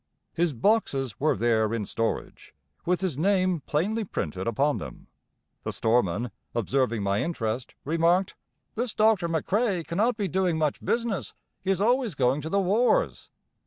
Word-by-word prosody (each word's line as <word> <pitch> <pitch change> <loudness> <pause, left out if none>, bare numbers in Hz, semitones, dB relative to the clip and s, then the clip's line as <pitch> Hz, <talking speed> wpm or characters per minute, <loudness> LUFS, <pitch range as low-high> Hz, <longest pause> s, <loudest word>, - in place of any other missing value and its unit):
His 170 -1 +1
boxes 135 - +1
were 155 -4 +2
there 110 0 +2
in 105 -3 -2
storage, 115 +3 -3 0.3
with 180 +1 +1
his 175 -8 -2
name 185 -2 +2
plainly 210 +9 0
printed 95 - -4
upon 140 +6 +1
them. - - -9 0.6
The - - -4
storeman, 115 -1 +1 0.2
observing 120 -1 0
my 100 +1 +1
interest, 120 -7 -3
remarked: 170 +5 +2 0.4
"This 235 0 -2
Doctor 215 -5 +3
McCrae 185 - 0
cannot 215 +7 +1
be 205 -3 -1
doing 180 -1 +1
much 155 -2 -1
business; 230 -4 -1 0.3
he 190 - -4
is 195 -1 +1
always 240 - +2
going 130 +2 +2
to 160 - -5
the 200 - +2
wars." 230 - +1
165 Hz, 150 wpm, -26 LUFS, 125-200 Hz, 0.6 s, Doctor